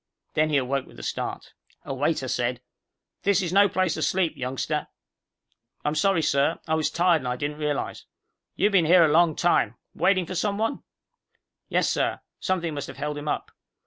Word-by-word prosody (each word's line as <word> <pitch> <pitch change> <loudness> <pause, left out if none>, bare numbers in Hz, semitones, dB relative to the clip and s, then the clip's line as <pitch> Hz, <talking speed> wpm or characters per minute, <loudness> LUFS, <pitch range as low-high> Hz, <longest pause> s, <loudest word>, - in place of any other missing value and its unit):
Then 155 0 +2
he 150 - +2
awoke 135 0 -1
with - - -16
a - - -9
start. - - -4 0.3
A - - -4
waiter 140 0 0
said, 120 0 -1 0.6
"This 200 -2 +3
is 175 0 -2
no 200 +1 +6
place 185 -2 +1
to 155 - -4
sleep, 180 0 +1
youngster." 135 +4 -2 1.0
"I'm 150 - +1
sorry, 165 +2 +2
sir. 140 +3 +2
I 160 - 0
was 160 -1 +1
tired 175 -1 +3
and 130 - -5
I 125 - -1
didn't 145 +3 -4
realize." 150 -2 -2 0.5
"You 205 +2 +2
been 185 -5 +4
here 175 +2 +7
for - - +7
a - - +2
long 165 -1 +4
time. 145 -10 +2 0.2
Waiting 185 -2 +2
for 185 - -6
someone?" 210 +7 -1 0.9
"Yes, - - +2
sir. - - 0 0.2
Something 175 -4 -1
must 145 -1 -4
have - - -10
held 150 +1 -3
him 145 +1 -6
up." - - -2
155 Hz, 190 wpm, -25 LUFS, 145-180 Hz, 1.0 s, here